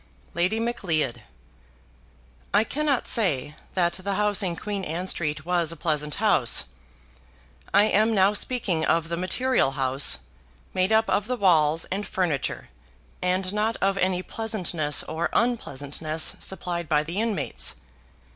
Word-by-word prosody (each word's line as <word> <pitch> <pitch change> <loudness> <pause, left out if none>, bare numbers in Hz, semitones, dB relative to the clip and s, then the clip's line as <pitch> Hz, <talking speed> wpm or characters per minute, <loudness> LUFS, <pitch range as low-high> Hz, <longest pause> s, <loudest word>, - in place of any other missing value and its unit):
Lady 180 +6 +1
Macleod. 170 - -1 1.3
I 210 - +5
cannot 285 +1 0
say 150 - +1 0.2
that 175 -2 +2
the 195 +1 -3
house 210 +1 +1
in 180 -3 -1
Queen 205 +1 -4
Anne 175 +2 -3
Street 155 -3 -1
was 175 -2 +1
a - - -5
pleasant 150 -2 -1
house. 135 - +3 1.1
I 200 - +6
am 215 +1 +3
now 195 +1 +4
speaking 200 -7 -1
of 165 0 +1
the 170 - -1
material 185 - +1
house, 135 - +1 0.6
made 185 +2 +1
up 220 0 +4
of 205 +1 0
the 250 0 -1
walls 165 -5 +3
and 200 +2 -2
furniture, 165 - -2 0.5
and 185 +1 0
not 215 +2 0
of 195 0 +1
any 185 -1 +1
pleasantness 180 -11 -1
or 160 +2 -2
unpleasantness 155 - 0
supplied 175 -4 -4
by 150 -1 +3
the 170 +7 -2
inmates. 225 -3 0
180 Hz, 135 wpm, -25 LUFS, 155-210 Hz, 1.3 s, I